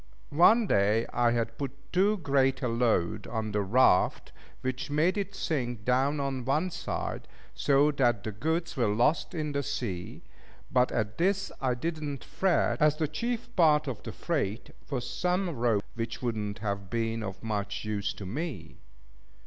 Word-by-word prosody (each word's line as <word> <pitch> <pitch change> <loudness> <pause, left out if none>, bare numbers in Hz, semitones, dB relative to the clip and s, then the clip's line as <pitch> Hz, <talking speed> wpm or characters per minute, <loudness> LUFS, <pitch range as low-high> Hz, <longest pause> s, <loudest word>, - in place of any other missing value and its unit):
One 215 +9 +6
day 105 - +3
I 120 -1 +3
had 115 -1 -1
put 135 -1 -7
too 200 +4 +3
great 135 -6 +1
a - - +2
load 115 -7 +1
on 110 -2 -3
the 105 0 +1
raft, 100 -1 +3 0.3
which 130 +2 -3
made 155 +6 +2
it 200 -1 -3
sink 120 - -2
down 135 +4 +2
on 135 -2 -2
one 150 +8 0
side, - - -4 0.3
so 145 +1 +3
that 120 -7 +1
the 110 - -3
goods 160 - -2
were 120 -5 +2
lost 120 - +1
in 155 -2 -2
the 140 0 0
sea; 120 -11 -4 0.5
but 125 -1 +3
at 105 -2 -2
this 195 +3 +1
I 130 -2 +1
did 160 +5 -3
not 140 -4 -4
fret, 185 -3 +1
as 150 0 +5
the 155 - 0
chief 240 - -3
part 155 -4 +4
of 120 -6 -4
the - - -6
freight 130 - -2 0.2
was 125 -4 -2
some 180 0 0
rope, 115 -7 +1
which 115 0 -4
would 120 -3 -1
not 105 -1 -3
have 100 -2 -3
been 115 -1 -1
of 95 -1 -6
much 105 -2 -3
use 105 -1 -1
to 100 - -8
me. 115 - -5
130 Hz, 175 wpm, -29 LUFS, 110-155 Hz, 0.5 s, One